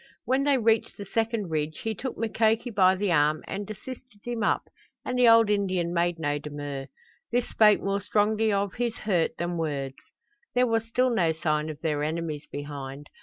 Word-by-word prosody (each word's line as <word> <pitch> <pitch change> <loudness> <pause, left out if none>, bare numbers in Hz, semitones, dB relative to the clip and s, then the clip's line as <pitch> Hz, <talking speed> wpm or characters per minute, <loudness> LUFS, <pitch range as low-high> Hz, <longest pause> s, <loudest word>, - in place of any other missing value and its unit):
When 265 +2 +1
they 285 -2 +4
reached 225 -2 +1
the 200 - -6
second 225 -2 -1
ridge 155 0 -2
he 225 - -2
took 255 +3 -5
Mukoki 225 +1 +1
by 190 -3 +4
the 195 0 0
arm 150 -1 +3
and 200 +1 -5
assisted 230 0 -9
him 240 -2 -3
up, - - +2 0.4
and 250 - -2
the 250 -1 +5
old 230 -1 +7
Indian 185 -4 0
made 175 0 +1
no 145 -2 -1
demur. 145 -2 -6 0.4
This 245 0 +1
spoke 210 -2 +5
more 195 +1 -1
strongly 215 +2 +2
of 200 -1 0
his 240 -1 -1
hurt 185 -6 0
than 175 0 -2
words. 140 -4 -3 0.6
There 250 0 +4
was 225 -1 0
still 250 +2 +2
no 170 -8 +2
sign 155 -1 -1
of 155 -1 -8
their 150 -3 0
enemies 155 -1 -3
behind. 145 -1 -7
195 Hz, 185 wpm, -27 LUFS, 155-225 Hz, 0.6 s, old